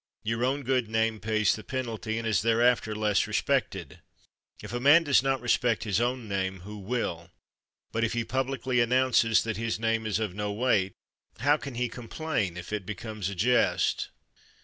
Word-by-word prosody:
Your 115 +2 -1
own 135 +3 0
good 125 -3 0
name 110 0 0
pays 110 -2 +1
the 110 - -9
penalty, 115 -3 -3
and 115 0 -3
is 105 -5 +2
thereafter 115 -1 +2
less 105 -2 +1
respected. - - -1 0.6
If - - -7
a 120 - -1
man 145 +6 +6
does 140 -5 +4
not 135 -1 0
respect 120 -1 +1
his 105 -1 0
own 120 -1 -1
name, 95 -2 -2
who 105 +3 -9
will? 95 -6 -3 0.6
But 115 - -1
if 115 - 0
he 120 0 0
publicly 130 0 -1
announces 120 -2 +3
that 115 -2 -3
his 115 -1 -2
name 115 0 0
is 105 -3 0
of 110 -4 -2
no 105 +1 -3
weight, 105 -4 +1 0.5
how 145 +3 +4
can 140 -4 -8
he 125 +1 0
complain 115 - -3
if 90 +4 -7
it 105 -2 -2
becomes 105 0 -5
a 100 - -6
jest? 120 +7 +2
115 Hz, 180 wpm, -28 LUFS, 105-125 Hz, 0.6 s, man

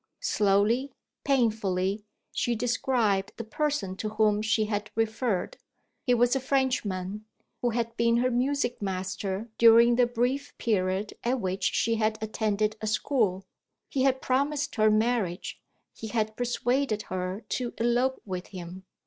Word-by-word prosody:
Slowly, 220 - +2 0.3
painfully 210 -6 +1 0.3
she 240 - 0
described 230 -4 0
the 230 - -4
person 230 -4 -2
to 215 - -3
whom 215 -1 +2
she 215 0 +1
had 210 0 -3
referred. 225 - -1 0.5
He 245 - +5
was 245 +2 +3
a - - +2
Frenchman, 215 -7 -1 0.4
who 245 - +2
had 230 0 -2
been 235 0 +3
her 250 +1 +2
music 250 0 0
master 190 +2 -3
during 235 +1 +7
the 245 -1 +4
brief 245 +4 -1
period 195 -2 0
at 250 +2 +1
which 190 -1 -2
she 230 0 +1
had 215 0 +1
attended 215 0 -1
a 215 - -3
school: 215 -4 0 0.4
he 270 - -1
had 260 0 +2
promised 285 +2 0
her 215 -2 +4
marriage; 215 -4 0 0.3
he 220 - -7
had 220 -1 -1
persuaded 245 -1 0
her 185 +3 -3
to 245 -2 -2
elope 240 +3 +1
with 185 -2 -5
him. 185 0 -9
220 Hz, 140 wpm, -28 LUFS, 205-245 Hz, 0.5 s, during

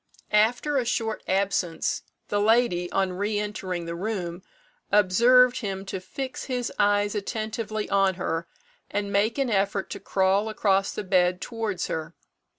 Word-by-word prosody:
After 240 +7 +3
a - - 0
short 225 -2 -1
absence, 190 -4 0 0.3
the 205 0 +1
lady, 215 -5 +2
on 190 -1 +1
re 205 +3 -1
entering 190 -4 -3
the 170 - -4
room, 180 -2 -3 0.5
observed 240 +6 +5
him 195 -4 -4
to 190 -1 -4
fix 260 +8 -6
his 250 -3 -2
eyes 205 0 +3
attentively 215 0 -3
on 195 -2 +2
her, 170 -2 -2 0.4
and 200 0 -2
make 210 +5 +2
an 270 -4 0
effort 195 -1 0
to 200 - -5
crawl 195 +2 +1
across 195 -2 +1
the - - -4
bed 180 -1 +2
towards 220 -4 -3
her. 160 +1 -4
205 Hz, 150 wpm, -26 LUFS, 190-220 Hz, 0.5 s, observed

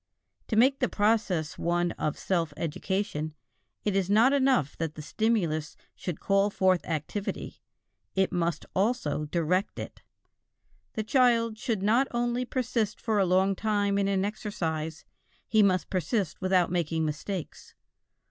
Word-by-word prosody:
To 220 - -1
make 265 +5 +4
the - - +1
process 205 -7 +1
one 175 0 +1
of 150 - -2
self 165 -5 -1
education, 160 -1 -2 0.5
it 205 -2 +1
is 195 -1 +1
not 225 +6 +5
enough 260 - +2
that 160 -2 -2
the 155 - -7
stimulus 170 -7 0 0.2
should 175 -4 -5
call 195 +1 +2
forth 185 -3 +2
activity, 165 +6 -4 0.5
it 190 -1 +2
must 170 -2 -1
also 185 - 0
direct 175 +5 0
it. - - -7 0.9
The 220 - -2
child 230 -2 +3
should 220 -6 -1
not 235 +6 +3
only 240 +1 -1
persist 245 -4 -1
for 220 -3 0
a 190 - +3
long 190 +2 +3
time 205 -1 +1
in 200 - +1
an 195 -1 +1
exercise; 160 -7 -3 0.4
he 220 -1 +4
must 185 -3 +2
persist 185 +1 -1
without 185 -2 +2
making 165 -2 0
mistakes. 155 +4 -5
195 Hz, 140 wpm, -28 LUFS, 165-220 Hz, 0.9 s, not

